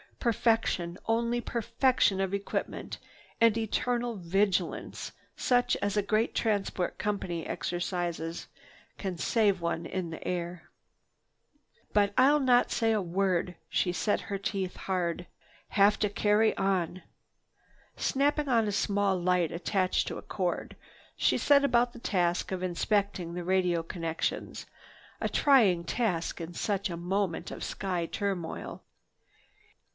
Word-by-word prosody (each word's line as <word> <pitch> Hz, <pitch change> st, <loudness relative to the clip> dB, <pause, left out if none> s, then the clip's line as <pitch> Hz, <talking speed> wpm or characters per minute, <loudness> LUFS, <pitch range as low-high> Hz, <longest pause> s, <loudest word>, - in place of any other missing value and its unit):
"Perfection, 225 Hz, -7 st, +1 dB
only 235 Hz, +1 st, +1 dB
perfection 235 Hz, -3 st, +1 dB
of 195 Hz, 0 st, -1 dB
equipment 200 Hz, 0 st, -3 dB, 0.4 s
and 230 Hz, -1 st, +5 dB
eternal 240 Hz, +2 st, -1 dB
vigilance 190 Hz, +2 st, -1 dB, 0.2 s
such 245 Hz, -1 st, +2 dB
as 200 Hz, +1 st, 0 dB
a -, -, +4 dB
great 215 Hz, +3 st, +1 dB
transport 200 Hz, -4 st, -1 dB
company 190 Hz, -5 st, -2 dB
exercises 175 Hz, -2 st, -3 dB, 0.5 s
can 190 Hz, -3 st, -3 dB
save 200 Hz, 0 st, +2 dB
one 170 Hz, 0 st, -2 dB
in 180 Hz, -2 st, -3 dB
the 160 Hz, -, -7 dB
air. 175 Hz, -1 st, -4 dB, 1.2 s
"But 205 Hz, -1 st, +3 dB
I'll 285 Hz, +3 st, +6 dB
not 250 Hz, -3 st, +4 dB
say 225 Hz, -1 st, +2 dB
a 215 Hz, -2 st, +2 dB
word!" 180 Hz, 0 st, 0 dB
She 180 Hz, -, +1 dB
set 180 Hz, +5 st, 0 dB
her 200 Hz, -, -4 dB
teeth 195 Hz, -2 st, -3 dB
hard. 180 Hz, -2 st, -2 dB, 0.4 s
"Have 205 Hz, +1 st, +4 dB
to 210 Hz, -, +1 dB
carry 210 Hz, +2 st, +3 dB
on." 185 Hz, -2 st, 0 dB, 0.9 s
Snapping 290 Hz, +2 st, +1 dB
on 230 Hz, -3 st, +3 dB
a -, -, 0 dB
small 200 Hz, -1 st, +1 dB
light 180 Hz, -2 st, +2 dB
attached 185 Hz, +2 st, 0 dB
to -, -, -4 dB
a -, -, -7 dB
cord, 180 Hz, -3 st, -3 dB, 0.4 s
she -, -, +2 dB
set 280 Hz, -1 st, +5 dB
about 245 Hz, -2 st, +3 dB
the 240 Hz, -, -10 dB
task 175 Hz, -6 st, 0 dB
of 185 Hz, -1 st, -2 dB
inspecting 185 Hz, -1 st, 0 dB
the 175 Hz, 0 st, -4 dB
radio 180 Hz, -2 st, +2 dB
connections, 165 Hz, -1 st, -3 dB, 0.5 s
a -, -, -1 dB
trying 215 Hz, -12 st, +4 dB
task 180 Hz, -4 st, -1 dB
in 165 Hz, +1 st, -6 dB
such 200 Hz, +2 st, -1 dB
a 170 Hz, -, -4 dB
moment 180 Hz, 0 st, -1 dB
of -, -, -6 dB
sky 180 Hz, -4 st, -2 dB
turmoil. 190 Hz, -4 st, -4 dB
195 Hz, 130 wpm, -29 LUFS, 175-225 Hz, 1.2 s, I'll